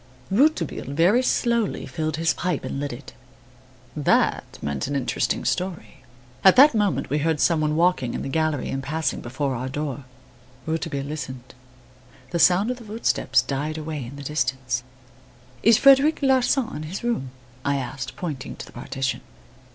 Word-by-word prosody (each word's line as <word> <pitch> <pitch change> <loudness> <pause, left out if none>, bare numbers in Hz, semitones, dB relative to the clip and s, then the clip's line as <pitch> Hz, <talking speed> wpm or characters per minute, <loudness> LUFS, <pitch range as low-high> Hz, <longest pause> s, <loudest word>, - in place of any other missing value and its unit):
Rouletabille 195 - +1
very 185 - +4
slowly 235 -4 0
filled 155 -1 -3
his 165 0 +2
pipe 180 -4 -2
and - - -4
lit 145 0 -3
it. 125 +2 -10 0.8
That - - +1
meant 70 - -3
an 145 - -3
interesting 135 -3 -1
story. 180 -5 -2 0.5
At 190 - +8
that 285 +2 +8
moment 210 -9 0
we 150 - +2
heard 160 0 0
some 165 0 +3
one 150 0 +1
walking 165 -7 +2
in - - -3
the - - -4
gallery 155 -1 0
and 135 - -2
passing 145 0 -2
before 130 +3 -2
our 125 +2 -4
door. 140 -1 -4 0.6
Rouletabille 160 -3 -2
listened. 130 -4 -7 0.8
The 170 - -1
sound 185 +7 +4
of 250 - -4
the 240 - -11
footstep 215 +2 -2
died 150 +3 -3
away 155 -2 -4
in 120 +4 -9
the 140 - -8
distance. 130 -3 -1 0.8
"Is 225 -1 +6
Frederic 275 +3 +5
Larsan 265 -1 +2
in - - -6
his 190 - -6
room?" 235 - -1 0.3
I 140 0 +1
asked, 135 -1 -5
pointing 145 -7 -5
to - - -8
the - - -15
partition. 135 +2 -3
155 Hz, 165 wpm, -24 LUFS, 135-190 Hz, 0.8 s, At